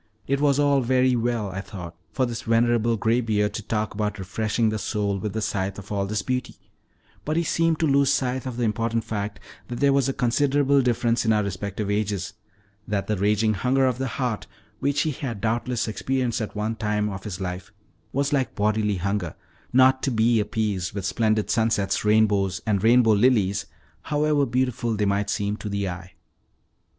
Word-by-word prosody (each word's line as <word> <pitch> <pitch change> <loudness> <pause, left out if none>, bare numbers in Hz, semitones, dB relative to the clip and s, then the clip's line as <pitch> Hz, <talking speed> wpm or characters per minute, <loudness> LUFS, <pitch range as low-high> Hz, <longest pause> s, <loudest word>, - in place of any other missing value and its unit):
It 140 +1 0
was 140 -2 +3
all 145 -1 +3
very 130 +1 +3
well, 115 -4 -1
I 95 +2 -4
thought, 90 -5 -9 0.2
for 130 - +1
this 120 -1 -4
venerable 115 0 +2
graybeard 110 -2 +1
to 110 - -4
talk 110 0 -2
about 105 0 -2
refreshing 110 +4 0
the 110 0 -2
soul 100 0 -1
with 105 +1 -4
the 110 -1 -2
sight 95 -1 -2
of 100 0 -10
all 100 -1 -1
this 105 +1 -2
beauty; 125 -1 -2 0.7
but 155 +2 -1
he 170 - +2
seemed 165 0 +1
to - - +3
lose 140 -1 +3
sight 130 -1 -1
of 125 -2 -5
the 125 - -1
important 115 +1 0
fact 105 -1 -4 0.3
that 120 -1 -5
there 140 -1 +4
was 135 -1 +2
a - - -1
considerable 140 +3 +2
difference 120 -1 +1
in 110 - +2
our 105 -1 +3
respective 100 +1 -3
ages, 100 -2 -1 0.5
that 100 -1 -1
the 110 - 0
raging 105 +2 +2
hunger 130 +6 +2
of 130 -1 0
the 135 - -1
heart, 125 -5 -2 0.3
which 140 +1 +1
he 155 - 0
had 125 -6 -5
doubtless 115 +2 -1
experienced 125 +2 -1
at 110 - -5
one 110 +2 -2
time 105 -1 0
of 95 -2 -5
his 95 -4 -5
life, 90 -1 -5 0.4
was, 140 +2 0
like 135 -3 0
bodily 105 0 +1
hunger, 95 -2 -2 0.4
not 130 +1 +5
to - - 0
be 115 -1 +3
appeased 105 -3 -1
with 100 -2 -3
splendid 110 +1 +1
sunsets, 110 -4 +1
rainbows 105 -3 +2
and 100 -3 0
rainbow 115 0 +5
lilies, 105 -3 +2 0.3
however 150 -1 +1
beautiful 125 -1 0
they 105 0 0
might 100 0 0
seem 100 0 -1
to 105 - -6
the 100 -1 -1
eye. 90 0 -7
110 Hz, 190 wpm, -24 LUFS, 100-125 Hz, 0.7 s, not